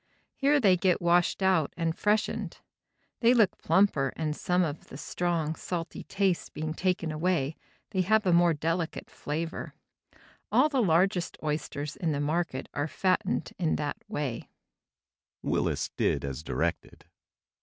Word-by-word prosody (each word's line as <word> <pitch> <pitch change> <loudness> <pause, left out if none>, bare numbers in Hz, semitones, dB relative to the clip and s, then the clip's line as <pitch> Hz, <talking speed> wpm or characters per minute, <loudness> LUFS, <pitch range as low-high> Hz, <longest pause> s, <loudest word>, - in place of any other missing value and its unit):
Here 285 +1 +3
they 195 -7 +5
get 180 0 +2
washed 175 +2 +2
out 185 -6 +2
and 165 -1 0
freshened. 210 +1 0 0.6
They 240 +1 +5
look 220 -5 +4
plumper 160 -6 +3
and 155 -2 -2
some 180 +3 +1
of 155 -2 -4
the 135 - -9
strong, 165 -1 -1
salty 170 0 -5
taste 195 -3 -1
being 155 0 -3
taken 180 -2 0
away, 155 -2 0 0.4
they 190 -3 +1
have 215 +3 +3
a 180 - +3
more 170 -1 +5
delicate 165 +2 -2
flavor. 160 +3 -4 0.8
All 305 - +5
the 270 -4 +1
largest 180 -1 +2
oysters 150 -1 -3
in 165 -3 0
the 140 - -1
market 150 -2 -1
are 145 +1 -1
fattened 185 +3 0
in 165 -3 +1
that 145 -1 -2
way." 135 -6 -4
170 Hz, 130 wpm, -28 LUFS, 155-185 Hz, 0.8 s, they